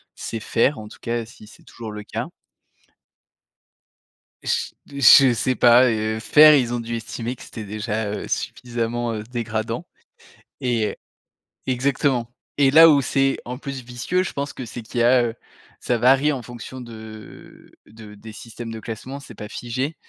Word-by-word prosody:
c'est 115 - -5
fer, 115 +4 +1
en 105 - -9
tout - - -13
cas, 115 0 -3
si 110 -2 -15
c'est 105 - -17
toujours 115 -2 -9
le 105 0 -7
cas. - - -5 2.2
J - - -2
je 135 -1 +7
sais 130 +3 0
pas, 120 +1 +6
heu, 110 0 -1
fer 150 +6 +7
ils 125 -4 +1
ont 120 - -1
dû 115 0 -4
estimer 115 +2 -5
que - - -17
c'était 110 - -8
déjà, 105 0 -3
heu, 105 - -5
suffisamment, 120 -1 -3
heu, 110 -1 -4
dégradant 115 +3 -4 0.8
et 115 -4 +1
heu - - -10 0.7
exactement, 130 -2 0 0.3
et 140 -2 +5
là 165 +3 +9
où 145 -2 +5
c'est 135 +1 +1
en 125 +1 -5
plus 140 -2 -6
vicieux, 125 +9 -1
je - - -5
pense 140 0 -3
que 130 - -7
c'est 120 +1 -8
qu'il 120 +2 -5
y - - +4
a, 125 0 +5
heu, 115 -1 -3 0.4
ça 120 - 0
varie 135 +5 +4
en 135 - -3
fonction 120 +2 -9
de 110 -2 -12 0.2
de 110 -1 -13
des 110 +2 -11
systèmes 115 +1 -9
de 110 - -6
classement, 120 +5 -7
c'est 140 -4 -12
pas 105 - -8
figé, 130 +8 -4
120 Hz, 175 wpm, -22 LUFS, 110-130 Hz, 2.2 s, là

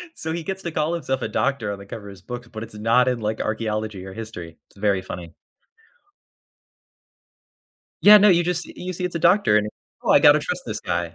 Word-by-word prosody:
So 160 0 -5
he 170 -1 -4
gets 190 +1 -5
to 170 - -4
call 155 +2 -1
himself 135 -6 -2
a - - -1
doctor 130 -7 -1
on - - -7
the 100 - -11
cover 100 0 -9
of - - -9
his 95 -1 -14
books, 120 +2 -8
but 110 -1 -7
it's 115 - -10
not 115 +4 +3
in, 125 -2 -1
like, 110 0 -2
archaeology 110 -3 -3
or 95 - -9
history, 90 -7 -8
it's - - -25
very 100 -2 +1
funny. 90 -2 -8 2.7
Yeah, 210 +1 +9
no, 210 +1 +6
you 175 -2 +5
just 175 0 -1
you 185 +1 -7
see 180 +1 -4
it's 180 - -3
a - - -1
doctor 170 - +4
and, 105 0 +1 0.3
"Oh, - - 0
I - - +7
gotta - - +7
trust - - -3
this - - -4
guy." 85 -1 -3
115 Hz, 220 wpm, -23 LUFS, 100-170 Hz, 2.7 s, Yeah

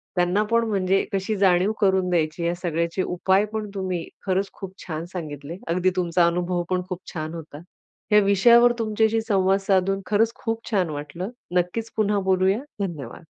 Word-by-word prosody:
त्यांना 180 +3 +2
पण 230 0 +3
म्हणजे 195 -1 +2
कशी 195 +2 -1
जाणीव 190 +1 +3
करून 190 -2 +3
द्यायची? 165 -1 0
या 170 - +1
सगळ्याचे 170 +1 -1
उपाय 190 +3 +2
पण, 215 -1 -3
तुम्ही 185 -3 -3 0.2
खरंच 195 0 0
खूप 190 -2 -8
छान 160 -1 -4
सांगितले. 155 -1 -6
अगदी 180 +2 +2
तुमचा 175 -1 +2
अनुभव 175 +1 -1
पण 185 0 +1
खूप 185 -1 -4
छान 155 -1 -4
होता. 160 -3 -8 0.5
ह्या 210 - +7
विषयावर 235 +5 +6
तुमच्याशी 220 0 +1
संवाद 195 -2 +3
साधून 195 0 +2
खरंच 225 +2 +2
खूप 225 -1 -1
छान 185 -5 +1
वाटलं. 150 +6 -5 0.3
नक्कीच 220 +6 -1
पुन्हा 210 -1 +2
बोलूया. 190 +3 +3 0.3
धन्यवाद. 150 -2 -9
185 Hz, 160 wpm, -24 LUFS, 175-200 Hz, 0.5 s, ह्या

